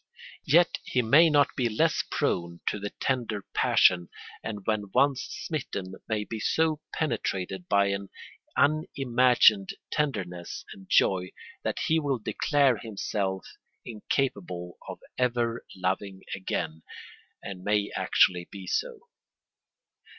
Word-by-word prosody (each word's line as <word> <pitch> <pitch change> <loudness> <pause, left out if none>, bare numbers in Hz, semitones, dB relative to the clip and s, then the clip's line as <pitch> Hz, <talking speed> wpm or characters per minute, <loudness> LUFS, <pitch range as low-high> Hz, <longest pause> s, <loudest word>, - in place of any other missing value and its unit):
Yet 170 +4 +4
he 125 - 0
may 150 +9 +6
not 145 -2 +3
be 125 -3 +1
less 110 - +2
prone 85 -1 -1
to 105 - -1
the 105 +1 -4
tender 115 -6 -1
passion, 90 -1 +4 0.3
and 105 -3 -5
when 105 -2 -1
once 135 0 +3 0.2
smitten 100 - -4 0.2
may 110 -1 0
be 110 +1 -6
so 155 +5 +1
penetrated 95 - -2
by 100 -1 +4
an 100 0 -3 0.5
unimagined 125 -8 +3 0.2
tenderness 95 - -3
and 95 -1 -15
joy, 90 -1 +3 0.3
that - - -2
he 160 -1 +3
will 140 -4 0
declare 135 +3 +2
himself 100 -3 -3 0.4
incapable 100 -7 -3
of - - -6 0.2
ever 120 -2 0
loving 95 +1 -2
again, 80 -4 -3 0.6
and 90 -2 -7
may 105 0 +1
actually 90 -1 +3
be 95 -2 -9
so. 480 - -2
105 Hz, 120 wpm, -28 LUFS, 95-135 Hz, 0.6 s, may